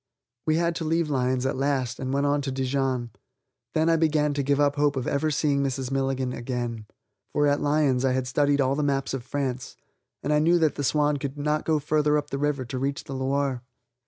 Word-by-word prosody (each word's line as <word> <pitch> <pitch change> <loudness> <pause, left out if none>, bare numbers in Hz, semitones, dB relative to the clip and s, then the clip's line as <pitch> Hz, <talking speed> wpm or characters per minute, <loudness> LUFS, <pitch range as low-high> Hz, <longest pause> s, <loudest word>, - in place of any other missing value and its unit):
We 155 - +3
had 170 +1 +1
to 165 - -3
leave 160 0 0
Lyons 130 -1 0
at 135 - 0
last 135 -2 -1
and 130 0 -3
went 140 +1 +1
on 145 0 +2
to 135 -1 -3
Dijon; 130 -2 -1 0.6
then 160 0 +3
I 165 0 +4
began 155 -2 +2
to 145 - -1
give 140 +1 +1
up 145 -1 +3
hope 145 -1 +2
of 130 -2 -2
ever 145 +2 +1
seeing 145 -2 +1
Mrs. 135 -1 -2
Milligan 135 -1 -1
again, 120 -3 -4 0.5
for 145 - +2
at 145 0 +2
Lyons 145 -4 +2
I 130 -1 +2
had 130 0 0
studied 145 +2 +2
all 130 0 +2
the 145 - -1
maps 140 -2 0
of 135 -3 -3
France, 130 -1 -3 0.5
and 150 - +1
I 150 - +4
knew 170 +3 +4
that 160 -3 +2
the 145 - -4
Swan 150 +1 +2
could 140 +1 -5
not 150 +1 -1
go 160 -1 +2
farther 150 0 +2
up 145 0 -4
the 140 - -2
river 145 -2 0
to 130 +2 -4
reach 140 +1 -2
the 135 - -7
Loire. 135 -1 -1
140 Hz, 225 wpm, -26 LUFS, 130-150 Hz, 0.6 s, I